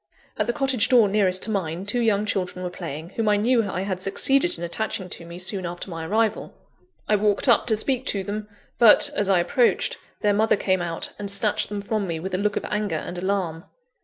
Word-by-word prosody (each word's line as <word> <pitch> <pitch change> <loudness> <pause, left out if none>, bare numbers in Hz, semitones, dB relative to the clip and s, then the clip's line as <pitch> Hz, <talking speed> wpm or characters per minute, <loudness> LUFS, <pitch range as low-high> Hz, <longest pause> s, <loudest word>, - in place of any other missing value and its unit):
At - - -1
the 240 - 0
cottage 265 -4 +2
door 240 -5 +6
nearest 195 -2 +1
to 220 - +1
mine, 180 -2 -3
two 205 +4 -1
young 215 -3 +1
children 185 -3 -3
were 180 - -4
playing, 165 -2 -7
whom 220 0 -1
I 205 - +3
knew 225 0 +2
I 185 - -3
had 190 -1 -3
succeeded 270 - +1
in 170 - -7
attaching 185 +1 -3
to 170 - -8
me 170 +1 -9
soon 185 +1 -2
after 175 +2 -6
my 165 -1 -5
arrival. 220 +2 -1 0.5
I 210 - +3
walked 205 +3 +1
up 235 -2 +4
to 220 -3 +2
speak 260 +4 -1
to 200 -2 -1
them; 210 +2 -5 0.3
but, 230 -3 +7
as 205 -1 0
I 190 - +4
approached, 235 +8 +1 0.2
their 205 -1 +2
mother 220 +2 +3
came 190 -2 0
out, 170 -1 -4
and 205 -1 -4
snatched 200 +1 +2
them 205 -1 -4
from 215 -2 -2
me 165 -2 -3
with 185 +3 -6
a 185 - 0
look 205 0 0
of - - -3
anger 210 -4 -2
and 165 +3 -5
alarm. 180 -3 -2
200 Hz, 225 wpm, -24 LUFS, 180-215 Hz, 0.5 s, but